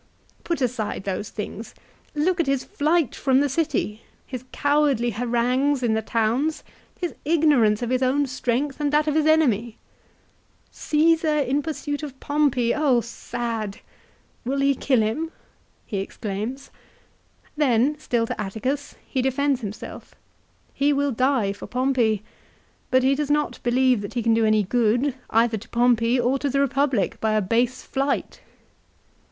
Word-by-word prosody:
Put 340 -4 -2
aside 235 -6 -2
those 200 +1 -3
things; 215 +1 -7 0.4
look 345 +5 +1
at 330 - +1
his 275 -1 +1
flight 310 -2 +1
from 265 -1 +2
the 285 - +2
city, 270 -7 -1 0.2
his 255 -1 -7
cowardly 285 -5 +2
harangues 245 +4 +1
in 230 -2 +2
the 220 - +1
towns, 230 +8 0 0.4
his 350 -2 -3
ignorance 285 -9 +3
of 240 - -2
his 255 0 +1
own 270 +3 +2
strength 260 +2 -2
and 290 -1 +1
that 300 0 +3
of 305 - 0
his 310 0 +2
enemy! 240 -8 +2 0.3
" - - -37
" - - -38
Caesar 315 0 +2
in 280 0 +1
pursuit 290 -1 -4
of 275 -3 -8
Pompey! 285 -5 +1
Oh, 280 -6 +2
sad! 230 -3 -5 0.2
" - - -33
" - - -38
Will 275 +2 -1
he 275 0 +4
kill 260 -2 +1
him? 260 +10 -1 0.3
" - - -39
he 200 - -3
exclaims. 215 +7 -5 0.8
Then, 275 -1 +2
still 235 -6 0
to 225 - -4
Atticus, 255 +8 -3
he 260 - -1
defends 265 +1 +1
himself. 205 -1 -8 0.6
He 285 +1 +2
will 285 0 +1
die 255 -4 +1
for 200 - -10
Pompey, 250 -5 +1 0.7
but 260 0 +3
he 265 +1 +4
does 290 +1 -2
not 295 0 0
believe 250 -1 +2
that 200 - -7
he 240 - -1
can 230 0 +3
do 225 0 +3
any 215 -1 +3
good 245 +6 +1 0.2
either 225 0 +2
to 210 - -15
Pompey 240 0 +2
or 250 +3 +1
to 285 - -1
the 275 - -1
Eepublic 275 -6 +1
by 220 -1 +1
a 215 - +3
base 235 +6 0
flight. 275 +1 -2
255 Hz, 165 wpm, -23 LUFS, 230-285 Hz, 0.8 s, he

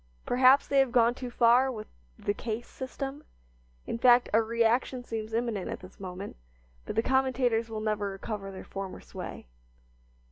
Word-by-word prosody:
Perhaps 255 +2 +5
they 275 - +3
have 270 -2 +3
gone 235 -1 +4
too 250 0 -6
far 245 +2 +4
with 215 -3 -6 0.3
the 205 - -1
"case 225 +2 -4
system"; 270 +2 -6 0.6
in 230 - -4
fact, 245 0 +6
a 225 - +6
reaction 235 +3 +1
seems 225 -2 -5
imminent 225 -4 -1
at - - -5
this 185 +1 -14
moment; 185 - -7 0.5
but - - -4
the 225 - +2
commentators 255 -3 +1
will 220 -1 -4
never 210 -2 -1
recover 195 +1 -5
their 190 - -8
former 195 -1 -6
sway. - - -8
230 Hz, 165 wpm, -29 LUFS, 215-255 Hz, 0.6 s, fact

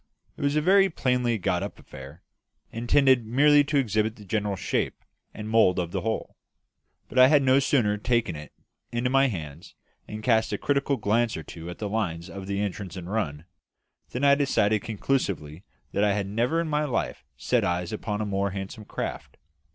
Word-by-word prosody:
It - - -10
was 140 +1 +1
a 150 - +3
very 195 +4 +5
plainly 125 -7 0
got 90 -2 0
up 100 - -5
affair, 70 +6 -12 0.5
intended 125 +2 +3
merely 145 +6 +5
to 145 +1 0
exhibit 110 -3 +1
the 105 - -13
general 105 0 -1
shape 95 - -2 0.3
and 105 - -7
mould 110 -5 +4
of 85 -2 -2
the - - -2
hull; 110 0 -3 0.7
but 130 - -1
I 130 - +9
had 145 0 +4
no 130 +1 +5
sooner 120 -7 +2
taken 115 -6 0
it 75 0 -9 0.4
into 120 +1 -1
my 135 +1 +4
hands 80 - -7 0.3
and 110 0 -7
cast 110 -1 +2
a - - 0
critical 140 -1 0
glance 115 0 +1
or 80 - -6
two 80 +3 -9
at 90 - -7
the 105 - -4
lines 90 -5 -3
of 95 +1 -8
the 100 0 -2
entrance 100 -2 -4
and 90 +1 -7
run, 85 -8 -2 0.6
than 125 - -4
I 140 0 +6
decided 110 -7 +2
conclusively 100 - -2 0.3
that 100 - 0
I 105 -1 +3
had 100 -1 -1
never 120 +10 0
in 170 - -1
my 150 0 0
life 125 - -2
set 120 - +1
eyes 90 +1 -1
upon 105 -1 -3
a - - -1
more 100 0 -1
handsome 95 +2 -7
craft. - - -6
110 Hz, 190 wpm, -26 LUFS, 95-130 Hz, 0.7 s, I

